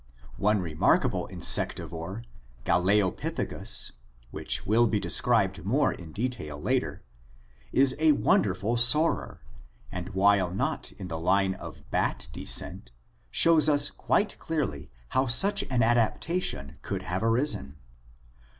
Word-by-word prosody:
One 105 -1 +1
remarkable 80 -3 +1
insectivore, 95 +7 -1 0.4
Galeopithecus, 95 +1 0 0.4
which - - -3
will 115 +3 +3
be 105 -1 0
described 100 -6 +1
more 130 +9 +1
in 85 -3 -11
detail 105 - -4
later, - - -2 0.7
is 135 -1 +3
a 155 -1 +5
wonderful 105 -1 +1
soarer, 150 +8 +2 0.5
and 90 0 -6
while 100 -1 +3
not 95 - -3
in 95 -2 -9
the 80 -2 -5
line 95 +3 +1
of - - -11
bat - - -1
descent - - -2 0.4
shows 155 - +5
us 145 -1 +4
quite 210 0 -1
clearly 145 - -4 0.2
how 130 +1 0
such 195 - +4
an 125 -2 +1
adaptation 120 - -1
could - - -5
have 90 +5 -3
arisen. 115 - -1
105 Hz, 115 wpm, -27 LUFS, 90-130 Hz, 0.7 s, a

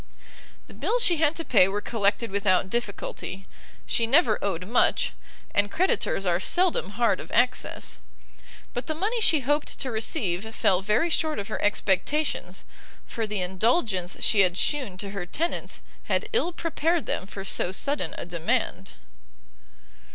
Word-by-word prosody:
The - - -14
bills - - +1
she 345 -6 +4
had 310 0 +2
to 330 - -3
pay 190 -6 +5
were 200 +2 -2
collected 210 0 0
without 190 -2 +1
difficulty; 200 -4 -4 0.4
she 230 - +2
never 305 +9 +4
owed 185 -3 -2
much, 240 - +2 0.4
and 205 0 +2
creditors 330 - 0
are 175 -1 +2
seldom 330 - +1
hard 230 -6 +2
of - - -9
access; 250 +2 0 0.7
but 245 0 -4
the 315 - -2
money 430 +8 -1
she 315 -8 +4
hoped 290 +3 0
to 260 - -2
receive 220 -1 -1
fell 185 -1 +2
very 215 - +1
short 315 -1 0
of 200 +1 -4
her - - -3
expectations, 210 +9 0 0.4
for 225 -2 -3
the 210 -2 -2
indulgence 190 - 0
she 215 - +3
had 180 -2 +4
shewn 260 -10 0
to 200 +1 -4
her 195 -3 -5
tenants 335 - -2 0.2
had - - 0
ill 450 -6 +3
prepared 330 -1 -1
them 185 - -2
for 195 0 -7
so 180 - +1
sudden 280 +9 -2
a - - -5
demand. 170 -2 -2
220 Hz, 155 wpm, -26 LUFS, 195-300 Hz, 0.7 s, pay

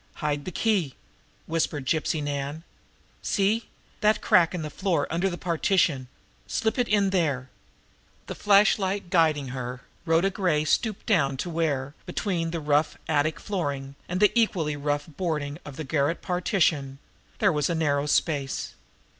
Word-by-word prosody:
"Hide 145 -2 -2
the 185 - -4
key!" 185 - 0 0.5
whispered 155 -4 -1
Gypsy 155 +1 0
Nan. 145 +2 -3 0.6
"See 210 +3 0 0.3
that 210 0 +3
crack 175 -1 +4
in 170 - -3
the 150 - -5
floor 175 -6 0
under 175 +4 +1
the 175 - -5
partition! 165 -6 +1 0.4
Slip 220 +3 -1
it 245 - +2
in 200 -2 +2
there!" 145 -9 0 0.7
The - - -5
flashlight 200 -2 +3
guiding 155 -6 +3
her, 125 -1 -5 0.3
Rhoda 165 +4 +3
Gray 175 -7 +1
stooped 215 +6 0
down 140 -10 +2
to 175 +6 -4
where, 145 -4 -1
between 175 -2 -1
the 165 0 -3
rough 150 0 +1
attic 155 0 +1
flooring 140 -9 -3 0.2
and 180 +1 -1
the 210 0 +5
equally 180 -10 +1
rough 145 0 -1
boarding 150 -2 -3
of 145 - -9
the 155 - -5
garret 145 +3 0
partition, 165 -7 +1 0.4
there 200 -5 +3
was 150 +1 +1
a 170 - 0
narrow 145 -2 +1
space. 145 -3 0
160 Hz, 150 wpm, -26 LUFS, 145-185 Hz, 0.7 s, the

